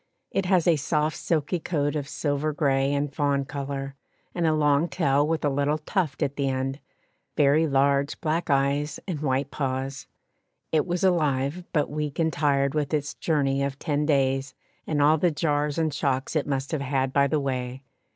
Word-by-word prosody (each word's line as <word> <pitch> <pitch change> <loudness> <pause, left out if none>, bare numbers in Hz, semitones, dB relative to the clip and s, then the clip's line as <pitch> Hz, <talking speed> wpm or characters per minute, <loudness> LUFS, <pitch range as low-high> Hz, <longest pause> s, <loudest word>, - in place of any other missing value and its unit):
It 195 -2 -1
has 180 -3 +3
a 165 -2 +5
soft 150 +2 0
silky 165 +2 -1
coat 145 -3 -1
of 145 -2 -3
silver 150 +1 -1
grey 135 -2 +1
and 145 0 -1
fawn 140 -1 +1
colour, 135 -1 -5 0.4
and 170 -2 0
a 160 - +3
long 150 +2 +2
tail 145 -4 +2
with 160 -1 -1
a - - +3
little 145 +2 +1
tuft 155 -1 -1
at 140 +1 -2
the 140 -1 +1
end, 135 +1 -2 0.6
very 150 +2 +4
large 140 0 +2
black 165 +2 -1
eyes 140 +2 +1
and 170 -6 -3
white 135 -1 -1
paws. 135 -1 -3 0.6
It 155 +1 +2
was 175 +1 -1
alive, 155 -2 +1
but 150 -4 0
weak 150 -1 -3
and 160 -1 +1
tired 140 -2 +1
with 150 0 0
its 145 0 -2
journey 140 -4 0
of 140 0 -2
ten 150 0 -1
days 135 -2 +1 0.3
and 145 -2 +1
all 155 +2 +4
the 175 - +3
jars 150 -1 0
and 160 -2 0
shocks 140 0 -1
it 155 - 0
must 135 -1 -2
have 155 -3 -1
had 135 -1 -1
by 140 0 +4
the 150 +2 +1
way. 130 -1 -3
145 Hz, 185 wpm, -26 LUFS, 135-155 Hz, 0.6 s, a